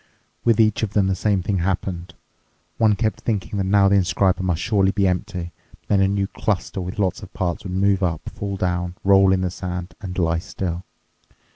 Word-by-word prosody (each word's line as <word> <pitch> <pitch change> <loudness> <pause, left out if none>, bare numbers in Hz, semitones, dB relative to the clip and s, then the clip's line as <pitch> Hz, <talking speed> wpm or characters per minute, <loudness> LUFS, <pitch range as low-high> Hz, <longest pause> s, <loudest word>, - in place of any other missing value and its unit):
With 115 -2 +3
each 110 -2 +3
of 105 -2 -2
them 100 -3 +3
the 95 - +1
same 100 -1 +1
thing 95 0 0
happened. 90 0 -2 0.6
One 110 -2 +4
kept 110 +1 -1
thinking 105 -2 -2
that 95 - 0
now 100 +1 +4
the 100 +1 +4
inscriber 95 0 +2
must 90 -3 0
surely 100 -1 +2
be 100 -1 +2
empty, 90 -1 -2 0.3
but - - -39
then 100 -1 +4
a 95 - +4
new 100 0 0
cluster 100 -1 -2
with 90 +2 -6
lots 95 -3 0
of - - -10
parts 90 -2 -2
would 90 - -4
move 100 +1 +2
up, 85 -4 -1
fall 100 -1 -4
down, 90 -1 -1
roll 95 -1 +5
in 95 -1 +2
the 90 -1 -1
sand, 90 -1 -5
and 90 -3 -6
lie 85 -2 +1
still. 90 -1 -4
95 Hz, 210 wpm, -22 LUFS, 90-100 Hz, 0.6 s, roll